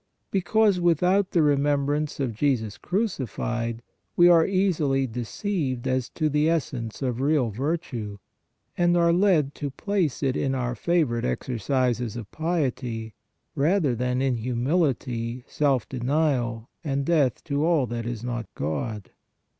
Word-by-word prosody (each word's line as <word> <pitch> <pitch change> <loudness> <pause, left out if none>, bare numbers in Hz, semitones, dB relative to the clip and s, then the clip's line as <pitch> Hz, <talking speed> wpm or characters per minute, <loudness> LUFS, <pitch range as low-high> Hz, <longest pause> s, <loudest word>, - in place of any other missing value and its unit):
Because 200 +1 +3
without 180 +3 +3
the 170 - +3
remembrance 145 +1 +1
of 130 -4 -1
Jesus 110 -4 0
crucified, 120 - -2 0.3
we 175 - +7
are 165 -2 +6
easily 165 -9 +1
de 125 -1 -5
ceived 135 - -2
as 130 -1 0
to 155 - -1
the 150 +1 +2
essence 130 -7 -2
of 125 -1 -1
real 140 -5 +2
virtue, 120 - -3 0.6
and 175 0 +3
are 170 0 +4
led 170 -7 +3
to 145 - -4
place 170 -1 -1
it 135 -1 +1
in 135 -1 0
our 125 -1 -1
favorite 150 -6 +1
exercises 120 - -1
of 115 -4 -7
piety, 130 -9 -2 0.4
rather 155 -1 +2
than 125 +2 -1
in 130 -3 +1
humility, 125 -1 -1
self 140 -5 +1
denial 125 -3 0 0.2
and 140 -3 -1
death 145 -8 +2
to 145 -1 -1
all 160 -5 +3
that 115 -1 -4
is 120 -2 -4
not 120 -3 -3
God. 95 +8 -3
135 Hz, 140 wpm, -25 LUFS, 120-160 Hz, 0.6 s, we